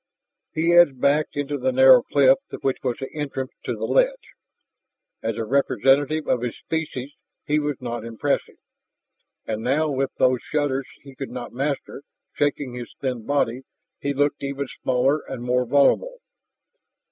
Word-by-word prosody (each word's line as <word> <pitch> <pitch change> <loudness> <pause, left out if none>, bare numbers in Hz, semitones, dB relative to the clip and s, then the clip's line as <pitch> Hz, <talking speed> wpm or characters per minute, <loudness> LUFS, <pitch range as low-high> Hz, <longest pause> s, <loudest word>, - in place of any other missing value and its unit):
He 165 +2 +1
edged 175 -7 +6
back 145 +4 +3
into 145 0 -3
the 130 +1 +1
narrow 130 -1 +7
cleft 135 +1 +4 0.2
which 135 -1 0
was 125 -3 -2
the 135 - -7
entrance 140 -3 -4
to - - -2
the - - -3
ledge. - - +1 0.9
As 115 -1 -2
a 115 - -2
representative 140 +4 +2
of 125 - +1
his 125 -1 -3
species 150 -5 -4 0.3
he 150 +1 +2
was 145 -2 -2
not 120 -2 -5
impressive, 115 +5 -2 0.9
and 110 -1 -3
now 145 +6 +1
with 135 0 0
those 130 -1 +2
shudders 140 -3 -1 0.2
he 135 -1 -12
could 135 +1 -6
not 125 -1 -7
master, 140 +1 -3 0.3
shaking 145 -3 -1
his 120 -1 -8
thin 125 -5 -3
body, 135 -3 0 0.4
he 140 - -2
looked 145 +1 0
even 140 0 -3 0.2
smaller 130 +4 +2
and 125 -2 -5
more 125 0 +1
vulnerable. 145 - +3
135 Hz, 155 wpm, -23 LUFS, 125-145 Hz, 0.9 s, narrow